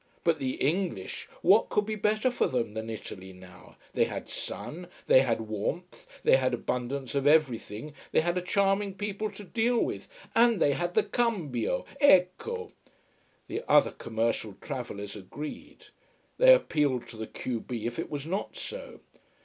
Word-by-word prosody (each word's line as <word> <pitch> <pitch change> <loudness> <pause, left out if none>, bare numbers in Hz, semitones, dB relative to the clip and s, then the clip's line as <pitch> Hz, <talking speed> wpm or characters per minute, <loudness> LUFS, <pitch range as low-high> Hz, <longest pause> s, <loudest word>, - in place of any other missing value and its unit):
But 165 -2 +2
the 130 -1 -1
English 165 - -2
what 195 +5 +5
could 210 - +1
be 215 - -3
better 215 +4 +1
for 245 - +1
them 115 -4 -1
than 110 +1 -5
Italy 95 -3 -7
now: 90 0 -15 0.2
they - - +3
had - - -6
sun, 175 +3 -5 0.2
they 130 - +7
had 115 -4 0
warmth, 110 - -4 0.2
they - - +6
had 130 -2 +1
abundance 125 +2 -3
of 140 0 +1
everything, 145 -3 +2 0.2
they - - +4
had 175 +2 0
a 180 - 0
charming 195 +1 +1
people 205 +1 -3
to 205 0 -10
deal 230 +6 +1
with, - - -1 0.3
and 230 -3 +5
they 145 - +4
had 175 +5 -2
the - - +5
cambio! 210 - -1
Ecco! 285 - +3 0.8
The - - -3
other - - +5
commercial 115 -2 -2
travellers 105 -7 -6
agreed. 125 +10 -8 0.5
They - - +9
appealed 150 - +3
to 115 - -9
the 110 0 -5
q 120 -3 -4
b 115 -1 -5
if 120 0 -3
it - - -3
was 145 -1 -4
not 190 +5 -3
so. - - -7
150 Hz, 165 wpm, -29 LUFS, -, 0.8 s, They